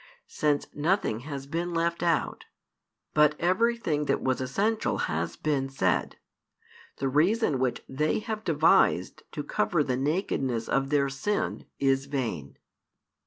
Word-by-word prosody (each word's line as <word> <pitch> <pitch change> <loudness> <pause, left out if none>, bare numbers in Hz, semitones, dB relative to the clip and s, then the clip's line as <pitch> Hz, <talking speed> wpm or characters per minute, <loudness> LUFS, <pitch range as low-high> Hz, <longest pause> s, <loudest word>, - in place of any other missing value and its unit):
Since 150 -1 0
nothing 150 - 0
has 140 -2 -5
been 170 +4 -3
left 170 0 0
out, 170 -1 0 0.7
but 150 0 +4
everything 185 -4 +1
that - - +1
was 130 -1 0
essential 205 - 0
has - - -2
been 140 -3 -1
said, 135 - 0 0.8
the 135 - -1
reason 155 - +2
which 130 -1 -1
they 150 +4 0
have 215 0 -4
devised - - +3
to - - -4
cover 205 - +1
the 130 -3 -1
nakedness 135 - -1
of 135 0 0
their 140 -1 +2
sin 135 +10 -2
is 135 0 +1
vain. 115 - -3
150 Hz, 130 wpm, -27 LUFS, 135-175 Hz, 0.8 s, but